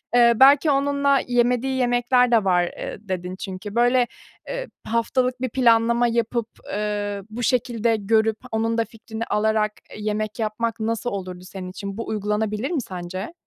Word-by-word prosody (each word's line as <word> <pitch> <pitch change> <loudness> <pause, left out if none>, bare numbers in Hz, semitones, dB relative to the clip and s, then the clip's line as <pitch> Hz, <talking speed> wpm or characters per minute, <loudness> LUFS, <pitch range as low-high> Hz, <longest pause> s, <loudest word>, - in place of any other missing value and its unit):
Eee, 235 -1 +6
belki 280 +4 +6
onunla 280 0 +2
yemediği 250 +2 +1
yemekler 245 0 +3
de 225 -3 +4
var, 180 -2 +3
eee, 175 - -5
dedin 185 -2 -4
çünkü. 195 +2 -7
Böyle, 245 +1 +4 0.4
eee, - - -4 0.2
haftalık 250 +2 0
bir 255 - -1
planlama 235 -1 +3
yapıp, 235 0 0 0.3
eee, 205 -1 -2
bu 235 +3 -5
şekilde 235 -2 +1
görüp, 220 +1 +2
onun 225 +1 0
da 230 - +2
fikrini 225 0 -7
alarak, 215 0 +1 0.2
eee, - - -9
yemek 215 +1 -3
yapmak 225 +1 -2
nasıl 225 +2 -1
olurdu 185 -4 -6
senin 185 0 -8
için? 200 +2 -6
Bu 230 - -5
uygulanabilir 210 - -1
mi 315 -6 0
sence? 185 - -6
225 Hz, 155 wpm, -23 LUFS, 210-245 Hz, 0.4 s, Eee